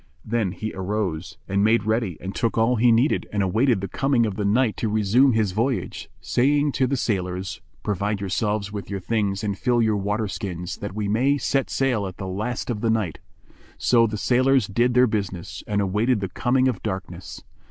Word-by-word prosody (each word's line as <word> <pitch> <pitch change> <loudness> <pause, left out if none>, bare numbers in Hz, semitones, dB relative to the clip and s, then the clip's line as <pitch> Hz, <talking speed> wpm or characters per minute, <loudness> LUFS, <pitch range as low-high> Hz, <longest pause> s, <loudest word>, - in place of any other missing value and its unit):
Then 110 -5 0
he 110 +2 -5
arose 95 -3 -3
and 100 +1 +1
made 110 0 +3
ready 110 -5 -1
and 95 +2 -6
took 115 -1 -1
all 115 +2 +3
he 120 +2 +5
needed 120 +6 +2
and 100 -1 0
awaited 110 +3 +2
the 100 - -3
coming 135 +2 +1
of 105 - -2
the 105 - -2
night 110 +3 +2
to 110 - -1
resume 110 +5 +3
his 110 -3 +1
voyage, 115 +6 -2
saying 145 +3 +2
to 130 -1 +1
the 135 +1 0
sailors, 95 -4 -2 0.2
"Provide 105 0 -1
yourselves 100 +1 -1
with 100 -2 -6
your 100 -1 -3
things 100 0 -1
and 100 -2 -1
fill 120 +3 +1
your 110 -2 +2
water 105 +2 -1
skins, 95 -3 -5
that 100 -1 -6
we 105 -1 -2
may 130 +7 +2
set 135 -1 0
sail 125 -7 0
at 95 - -9
the 95 - -5
last 110 +7 -3
of 105 -3 -4
the 115 - +1
night." 110 -7 0 0.6
So 115 -2 +4
the 105 0 -4
sailors 130 +2 +3
did 120 +6 +1
their 125 0 +6
business 100 -6 -4
and 105 -1 0
awaited 105 +5 +1
the 95 -1 -3
coming 130 +6 +1
of 120 -7 -1
darkness. 95 -3 -6
105 Hz, 200 wpm, -24 LUFS, 100-120 Hz, 0.6 s, their